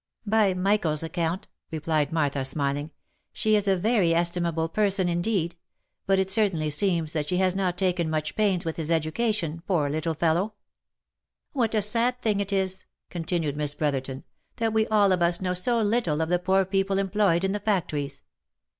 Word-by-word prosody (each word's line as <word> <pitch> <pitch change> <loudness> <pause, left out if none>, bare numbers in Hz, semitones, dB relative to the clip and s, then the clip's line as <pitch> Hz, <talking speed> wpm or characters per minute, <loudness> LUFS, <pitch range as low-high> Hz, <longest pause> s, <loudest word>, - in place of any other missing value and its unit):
" - - -50
By 210 -3 +2
Michael's 180 -5 +1
account," 170 +4 -2 0.2
replied 155 -2 -1
Martha, 145 -4 0
smiling, 140 +2 -2 0.4
"she 215 0 +1
is 205 -1 +1
a 195 - +4
very 195 -4 +2
estimable 170 -1 0
person 195 0 +1
indeed; 175 -1 0 0.5
but 195 0 +3
it 190 0 0
certainly 190 -8 +1
seems 165 -1 +1
that 150 -2 -2
she 180 - 0
has 185 0 +2
not 185 -2 -1
taken 180 -3 0
much 155 -1 -2
pains 195 -5 +1
with 160 - -3
his 160 -1 0
education, 165 +1 0
poor 155 -7 +1
little 155 +2 -2
fellow 170 +7 0 0.3
!" - - -64
" - - -57
What 230 -5 0
a 210 - +2
sad 235 +4 +1
thing 215 -4 0
it 200 0 -2
is," 190 -1 -1 0.3
continued 165 -3 -2
Miss 150 -1 0
Brotherton, 135 -3 -2 0.2
" - - -48
that 225 -2 0
we 220 0 +2
all 205 -2 +3
of 180 -1 +1
us 170 0 +2
know 180 -1 -1
so 230 +7 +1
little 205 -8 +1
of 160 0 -1
the 180 0 +2
poor 190 +1 +2
people 195 +1 0
employed 195 -3 +1
in 190 - +1
the 205 - -2
factories 170 -9 -2
180 Hz, 190 wpm, -26 LUFS, 160-200 Hz, 0.5 s, a